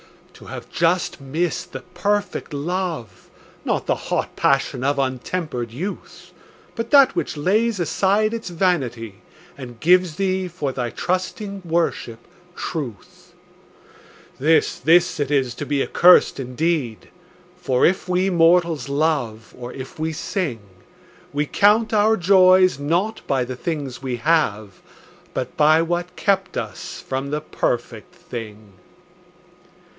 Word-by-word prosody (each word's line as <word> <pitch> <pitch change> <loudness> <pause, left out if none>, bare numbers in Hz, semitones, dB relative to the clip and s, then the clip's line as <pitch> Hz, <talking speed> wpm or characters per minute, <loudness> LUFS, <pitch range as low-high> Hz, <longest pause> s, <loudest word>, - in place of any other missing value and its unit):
To - - -15
have - - -9
just 170 -3 0
missed 160 +6 -2
the - - -7
perfect 200 +3 -2
love, 165 - -4 0.3
Not - - -1
the - - +2 0.2
hot - - -1
passion 135 -2 +1
of 140 +1 +1
untempered 130 -1 -2
youth, 175 - -7 0.4
But 230 -1 -4
that 275 -2 +6
which - - -2
lays 210 +7 +1
aside 200 +5 +1
its 225 -5 -5
vanity 125 - -1 0.3
And 120 -4 -10
gives 180 +2 +3
thee, 190 0 -1
for 165 -6 -3
thy 125 -2 -3
trusting 190 - -3
worship, 165 -8 -1 0.4
truth— 130 - -7 1.1
This, 160 +4 +2
this 170 +1 +3
it 145 -2 -1
is 135 -5 +1
to 145 - -6
be 140 -2 +1
accursed 180 -4 +5
indeed; 130 -2 -2 0.5
For 130 -8 +1
if 185 0 +1
we 185 +2 +1
mortals 170 -3 +3
love, 140 -7 -1
or 125 0 -8
if 130 +3 -9
we 160 +1 -1
sing, 155 - -3 0.7
We 145 +1 0
count 210 +7 +3
our 215 +1 +4
joys 185 -3 +5
not 175 +10 -1
by 130 -3 +1
the 130 +1 -6
things 140 -3 -4
we 130 -2 -3
have, 115 - 0 0.5
But 125 -1 -4
by 155 +2 +4
what 175 +1 -3
kept 195 -2 0
us 110 -5 -6
from 135 +1 -3
the 150 +1 -2
perfect 120 0 -3
thing. 110 - -9
160 Hz, 130 wpm, -21 LUFS, 130-185 Hz, 1.1 s, that